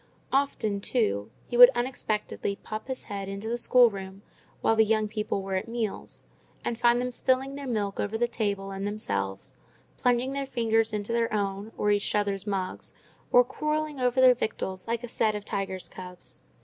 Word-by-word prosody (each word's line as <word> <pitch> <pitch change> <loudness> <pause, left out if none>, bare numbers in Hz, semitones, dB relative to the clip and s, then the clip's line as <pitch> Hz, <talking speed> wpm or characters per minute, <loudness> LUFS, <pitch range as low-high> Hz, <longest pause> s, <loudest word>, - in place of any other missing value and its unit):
Often, 220 -7 +1
too, 100 - 0 0.2
he 240 - -5
would 245 0 +11
unexpectedly 220 -5 -2
pop 215 +2 -7
his 260 -1 -4
head 200 -1 -5
into 200 +2 -5
the 240 +1 -1
schoolroom 200 -6 +3 0.4
while 225 - +3
the 220 - +6
young 215 0 +2
people 210 -2 -2
were 195 0 -4
at 185 - -4
meals, 230 -3 -4 0.4
and 235 - 0
find 240 +1 +3
them 250 0 -1
spilling 260 +2 +1
their 280 -1 -6
milk 205 -5 -2
over 205 +2 -1
the 240 +1 +2
table 200 -4 -2
and 195 +1 -3
themselves, 100 - -3 0.4
plunging 250 +2 +2
their 275 -1 -2
fingers 225 -2 +1
into 210 +1 -3
their 235 -1 +1
own 200 0 -2
or 210 - +2
each 205 0 +1
other's 205 -1 0
mugs, 190 -2 -3 0.4
or 245 - +7
quarrelling 305 +2 -2
over 250 0 +2
their 255 -1 +8
victuals 190 -5 -3
like 230 +1 -1
a - - -4
set 215 -2 +1
of 205 -1 -5
tiger's 190 -3 -3
cubs. 180 -1 -9
220 Hz, 180 wpm, -28 LUFS, 200-245 Hz, 0.4 s, would